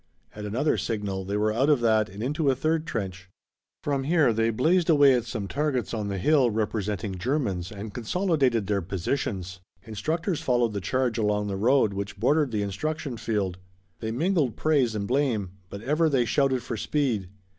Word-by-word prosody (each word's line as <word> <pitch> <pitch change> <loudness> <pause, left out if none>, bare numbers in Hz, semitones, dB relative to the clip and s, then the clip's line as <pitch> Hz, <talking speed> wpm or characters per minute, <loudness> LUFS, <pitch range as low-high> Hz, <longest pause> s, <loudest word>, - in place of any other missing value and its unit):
At 105 0 -7
another 125 +9 0
signal 100 -4 -3
they 100 +2 -2
were 105 +1 +1
out 135 +6 +2
of 145 -4 +4
that 110 -2 +3
and 100 +4 -7
into 145 +3 0
a 130 - +3
third 160 +3 0
trench. 95 - -4 0.5
From 140 -2 -1
here 155 -6 +3
they 115 +1 +1
blazed 160 +10 +2
away 145 -4 +6
at 120 -2 +1
some 110 -4 -4
targets 140 -1 -1
on 105 -3 -2
the 100 -1 -2
hill 135 - +3
representing 105 -3 -2
Germans 100 - -1
and 105 0 -7
consolidated 130 - +1
their 100 0 0
positions. 95 0 -3 0.2
Instructors 160 - -2
followed 120 -3 +1
the 100 - -3
charge 120 +3 0
along 105 -1 +1
the 100 - -2
road 110 +1 +3
which 100 0 -5
bordered 145 +5 +3
the 105 -3 -1
instruction 135 +7 -3
field. 105 -5 -2 0.4
They 110 - -3
mingled 150 - +1
praise 140 -8 +2
and 100 -1 -2
blame, 120 -8 0 0.2
but 100 +2 -8
ever 155 +5 +2
they 130 -4 +2
shouted 130 0 +1
for 120 - -4
speed. 115 -8 -1
115 Hz, 180 wpm, -26 LUFS, 100-140 Hz, 0.5 s, away